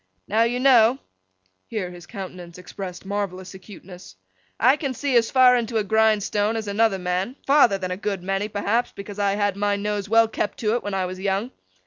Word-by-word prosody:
Now 220 +2 +1
you 235 +2 +1
know;' 250 -2 +5 0.7
here 195 -6 -4
his 175 0 -12
countenance 180 -4 -9
expressed 180 +1 -8
marvellous 195 -2 -4
acuteness; 180 - -13 0.4
'I 255 +6 +4
can 275 -3 -3
see 275 +1 -1
as 230 -1 +4
far 255 -1 +6
into 230 -1 -1
a 215 - +1
grindstone 215 0 +1
as 220 -2 -4
another 205 0 +2
man; 180 +6 -2
farther 270 -8 +4
than 185 -1 -4
a 180 - -3
good 195 -2 -3
many, 195 +2 -1
perhaps, 215 +3 -1
because 200 +1 -9
I 200 -1 +1
had 205 -2 0
my 205 0 0
nose 205 0 -3
well 225 +1 +5
kept 215 -1 -3
to 215 -1 +1
it 240 - 0
when 205 -1 -4
I 190 -1 0
was 185 +1 -6
young. 200 +5 -1
205 Hz, 195 wpm, -23 LUFS, 190-225 Hz, 0.7 s, far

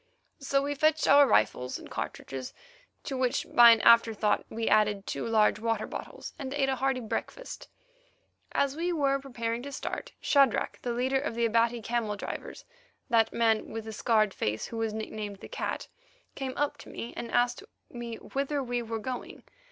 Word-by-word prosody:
So 275 0 +1
we 285 +1 -1
fetched 310 +2 +2
our 285 0 +7
rifles 125 - +2
and - - -11
cartridges, 130 -2 -6 0.5
to 270 - -4
which 255 -1 0
by 240 -1 +9
an 230 -1 +6
afterthought 225 -2 +4
we 225 0 -3
added 210 -2 +3
two - - -3
large 220 -2 +3
water 225 -1 -1
bottles, - - -8
and 270 -1 -4
ate 270 -2 +1
a 265 - 0
hearty 265 0 0
breakfast. - - -5 0.8
As 280 0 +1
we 345 +3 -1
were 275 -4 +1
preparing 235 -3 -3
to 280 +2 -7
start, 270 - -5
Shadrach, 275 -5 +2
the 245 - -2
leader 260 +3 +1
of 280 -5 -3
the 235 0 +1
Abati 230 +1 +2
camel 230 -2 -1
drivers, 200 - -7 0.5
that 225 -1 +4
man 225 -2 +1
with 225 0 -6
the 220 - -6
scarred 215 -2 +2
face 105 +1 -2
who 230 - -7
was 225 -1 -1
nicknamed 215 -1 -5
the - - -10
Cat, - - -4 0.5
came 265 -2 -4
up 290 0 0
to - - -12
me 235 - -7
and 235 - -5
asked 245 0 +2 0.3
me 240 -1 -6
whither 280 +3 -2
we 245 -1 -2
were 225 -1 -4
going. 250 +3 -6
235 Hz, 180 wpm, -29 LUFS, 220-270 Hz, 0.8 s, by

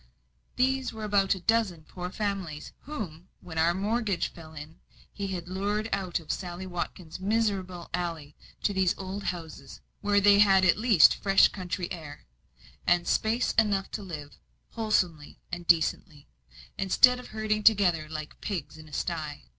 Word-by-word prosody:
These 265 +1 +1
were 220 -1 -8
about 200 -2 +2
a - - -7
dozen 190 -5 +1
poor 180 +3 -7
families, 190 -7 -4
whom, 185 - -6
when 160 -2 -6
our 170 +2 +3
mortgage 205 -2 0
fell 160 -2 -13
in, 150 +2 -10 0.3
he 200 -1 -4
had 180 -3 -5
lured 205 +4 -1
out 185 -3 -1
of 160 - -5
Sally 180 0 -5
Watkins' 175 -2 -5
miserable 190 -4 -1
alley 165 -5 -4 0.3
to 205 - +1
these 190 -2 +1
old 195 +1 -6
houses, 165 -6 -6 0.2
where 205 0 +2
they 200 0 +6
had 195 -2 +6
at 175 - +4
least 220 -7 +6
fresh 195 -1 +4
country 185 -1 -4
air, 155 -4 -8 0.6
and 175 0 +3
space 225 +3 +1
enough 200 -3 +1
to 215 - -4
live 155 -7 -8 0.3
wholesomely 180 -9 -1
and 175 -1 -6
decently, 160 -3 +1 0.5
instead 250 +6 +5
of 250 - -10
herding 215 -1 -1
together 185 -8 +4
like 155 -1 -7
pigs 175 -7 -4
in 155 - -12
a - - -17
sty. 155 - -3
185 Hz, 155 wpm, -28 LUFS, 165-205 Hz, 0.6 s, they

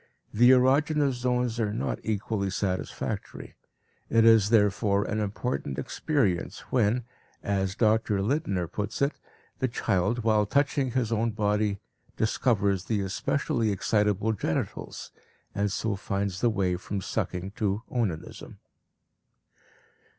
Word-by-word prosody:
The 120 +3 +6
erogenous 140 +3 +4
zones 125 -1 -1
are 105 -2 0
not 110 - -2
equally 105 -2 -2
satisfactory; 95 -1 -4 0.6
it 115 0 +4
is 110 -3 +6
therefore 105 -2 +3
an 110 - -2
important 105 - -3
experience 95 - -1
when, 120 0 +2 0.4
as 95 -1 -1
Dr. 110 -2 +2
Lindner 100 - 0
puts 105 +4 -4
it, 140 +1 +2 0.5
the 130 - +1
child 105 0 0
while 110 -2 +3
touching 140 0 +1
his 120 -4 0
own 115 +1 +1
body 105 -1 0 0.4
discovers 100 -4 +1
the 105 -3 0
especially 115 +3 -1
excitable 105 +2 +1
genitals, 80 -6 -4 0.4
and 100 0 0
so 110 +2 -1
finds 100 -1 -3
the 120 - +4
way 95 -5 0
from 100 +2 -4
sucking 95 -1 -3
to 105 +1 -1
onanism. 105 -10 -4
105 Hz, 120 wpm, -27 LUFS, 100-120 Hz, 0.6 s, The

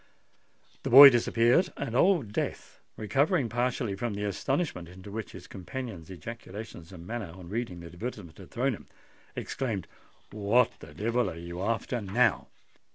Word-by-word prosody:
The - - -3
boy 140 +3 +12
disappeared; 120 +8 +3
and 120 -4 -4
Old 145 - +3
Death, - - -4 0.2
recovering 140 - +1
partially 120 -2 -1
from 110 +1 -3
the 105 - -3
astonishment 105 - -2
into 95 +3 -11
which 110 -1 -6
his - - -10
companion's 95 -3 -7
ejaculations 95 -1 -9
and 85 -2 -10
manner 110 -3 -5
on 90 -2 -11
reading 105 -5 -4
the - - -10
advertisement 90 -1 -7
had - - -12
thrown - - 0
him, - - -10 0.5
exclaimed, 110 -9 -3 0.5
"What 110 +4 +3
the 75 -1 -13
devil 115 +6 0
are 80 - -8
you 85 +1 -7
after 115 +3 -1
now?" 110 +3 +2
110 Hz, 155 wpm, -29 LUFS, 95-125 Hz, 0.5 s, boy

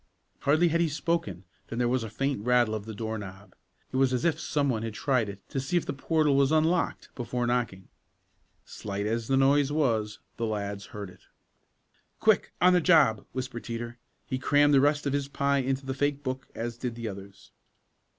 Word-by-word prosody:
Hardly 155 +5 +3
had 170 +1 +1
he 165 - +2
spoken 165 - -2 0.2
than 115 - -6
there 120 0 +2
was 125 +1 +1
the 110 - -5
faint 135 0 -2
rattle 120 -2 +3
of 105 -2 -4
the 110 -1 -7
door 110 +1 -3
knob. 100 0 -10 0.4
It - - -2
was 130 -1 +3
as 125 - 0
if 165 -2 +2
some 145 -4 0
one 115 -5 0
had 115 -1 -5
tried 125 -3 +1
it 100 0 -10
to 135 - -2
see 135 +7 0
if 175 - 0
the - - -3
portal 150 +1 +1
was 140 +1 +3
unlocked 160 +2 +1
before 120 0 -2
knocking. 120 -6 -1 0.8
Slight 100 -1 -5
as 115 +1 -1
the 135 - +2
noise 140 +1 +4
was, 115 -8 0 0.2
the 115 - -1
lads 100 -2 -4
heard 100 -3 -7
it. 90 - -19 1.0
"Quick! - - +3
On 180 +2 +6
the 180 - +4
job!" 150 - +4
whispered 130 -2 -5
Teeter. 120 +1 -6 0.3
He 130 - -3
crammed 145 +2 +4
the 135 - +6
rest 145 +1 +2
of 140 - 0
his 140 -1 -1
pie 140 0 +1
into 135 +1 -1
the 130 - -2
fake 145 +1 -1
book, 130 0 -4
as 115 +1 -4
did 125 -3 -3
the 115 -1 -5
others. 100 -1 -10
130 Hz, 205 wpm, -28 LUFS, 110-145 Hz, 1.0 s, On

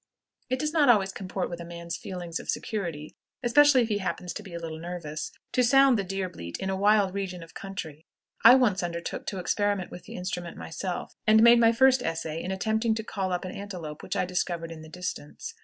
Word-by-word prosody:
It 255 - +1
does 305 +3 -2
not 295 -5 +4
always 195 -5 +4
comport 190 -1 -4
with 175 - -6
a - - -6
man's 170 0 -6
feelings 175 -3 -5
of - - -10
security, 170 -8 -3 0.3
especially 275 +1 +6
if - - -2
he 205 -1 0
happens 180 -2 -3
to - - -6
be 190 -5 -10
a - - -2
little 160 -1 -6
nervous, 165 -3 -5 0.2
to 250 - +3
sound 270 +1 +6
the 200 - 0
deer 195 0 -2
bleat 85 - -7
in 190 0 -2
a - - 0
wild 200 -1 +3
region 185 -3 -4
of 165 - -14
country. 160 -6 -7 0.4
I 230 +3 +10
once 230 -8 +3
undertook 170 -1 -4
to 195 - -3
experiment 200 +1 0
with 175 0 -10
the - - -9
instrument 180 -1 -5
myself, 180 +2 -5
and 220 +1 +7
made 235 0 +8
my 230 -1 +6
first 260 +2 +5
essay 165 -4 -3
in 180 - -5
attempting 220 +3 +1
to 220 - -3
call 195 -4 -3
up 180 +1 -2
an 185 - -5
antelope 180 -7 -7
which - - -4
I - - +1
discovered 175 -2 -2
in 160 -1 -8
the 160 - -11
distance. 180 - -6
190 Hz, 225 wpm, -27 LUFS, 170-220 Hz, 0.4 s, I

